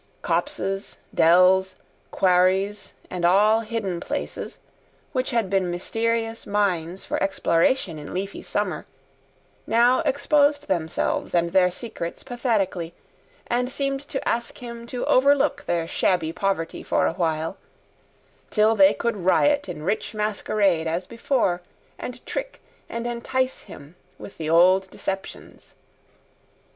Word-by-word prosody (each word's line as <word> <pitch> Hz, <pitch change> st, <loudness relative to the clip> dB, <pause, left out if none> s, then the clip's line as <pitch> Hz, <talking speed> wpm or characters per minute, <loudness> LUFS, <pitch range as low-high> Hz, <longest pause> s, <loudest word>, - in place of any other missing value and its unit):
Copses, 195 Hz, +1 st, -2 dB, 0.2 s
dells, 185 Hz, +3 st, +5 dB, 0.3 s
quarries 190 Hz, +2 st, +2 dB, 0.2 s
and 180 Hz, -1 st, -4 dB
all 205 Hz, +5 st, +5 dB
hidden 215 Hz, -6 st, -3 dB
places, -, -, -5 dB, 0.5 s
which 255 Hz, -2 st, -1 dB
had 230 Hz, -4 st, +1 dB
been 190 Hz, -1 st, +1 dB
mysterious 225 Hz, +5 st, -2 dB
mines 190 Hz, -4 st, -1 dB
for -, -, -2 dB
exploration 180 Hz, -1 st, +1 dB
in 145 Hz, -, -9 dB
leafy 195 Hz, +2 st, -4 dB
summer, 205 Hz, -3 st, -3 dB, 0.8 s
now 240 Hz, +3 st, +4 dB
exposed 290 Hz, +1 st, +2 dB
themselves 165 Hz, -1 st, -1 dB
and 170 Hz, 0 st, +1 dB
their 185 Hz, -1 st, +5 dB
secrets 180 Hz, -3 st, -6 dB
pathetically, 205 Hz, -9 st, -1 dB, 0.5 s
and 245 Hz, +1 st, -1 dB
seemed 275 Hz, 0 st, -1 dB
to 270 Hz, -, -3 dB
ask 235 Hz, 0 st, -1 dB
him 235 Hz, -1 st, -8 dB
to 245 Hz, 0 st, -3 dB
overlook 280 Hz, +2 st, +3 dB
their 170 Hz, -1 st, 0 dB
shabby 165 Hz, -2 st, 0 dB
poverty 195 Hz, -4 st, -2 dB
for -, -, +1 dB
a -, -, +1 dB
while, 165 Hz, 0 st, -1 dB, 0.9 s
till 215 Hz, +1 st, +3 dB
they 195 Hz, -1 st, +6 dB
could 235 Hz, -1 st, -1 dB
riot 285 Hz, +11 st, +2 dB
in 150 Hz, -, -6 dB
rich 205 Hz, +5 st, -2 dB
masquerade 205 Hz, -5 st, +1 dB
as 170 Hz, +3 st, -2 dB
before, 230 Hz, -6 st, 0 dB, 0.4 s
and -, -, -7 dB
trick -, -, -5 dB, 0.3 s
and 235 Hz, 0 st, -4 dB
entice 255 Hz, +2 st, -1 dB
him 145 Hz, +4 st, -12 dB, 0.2 s
with 195 Hz, -, -11 dB
the 155 Hz, -1 st, -3 dB
old 185 Hz, +3 st, +5 dB
deceptions. 195 Hz, +1 st, -7 dB
195 Hz, 125 wpm, -24 LUFS, 175-235 Hz, 0.9 s, they